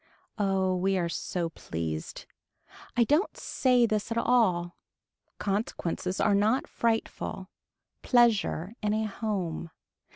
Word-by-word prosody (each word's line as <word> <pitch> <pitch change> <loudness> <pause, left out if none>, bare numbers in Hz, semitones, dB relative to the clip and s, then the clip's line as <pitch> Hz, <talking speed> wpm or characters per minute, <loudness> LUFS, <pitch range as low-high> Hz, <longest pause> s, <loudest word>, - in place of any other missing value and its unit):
Oh 190 -2 +2
we 190 +1 +1
are 175 -2 0
so 170 0 -2
pleased. 80 - -5 0.7
I 240 - +6
don't 300 - +1
say 250 -3 +2
this 215 0 -1
at 230 - -1
all. 190 -8 +2 0.6
Consequences 195 -3 -2
are 210 - +3
not 215 +6 +2
frightful. 225 -4 -2 0.5
Pleasure 220 -6 +3
in 210 0 +1
a 220 0 0
home. 195 -6 -3
205 Hz, 110 wpm, -28 LUFS, 180-230 Hz, 0.7 s, I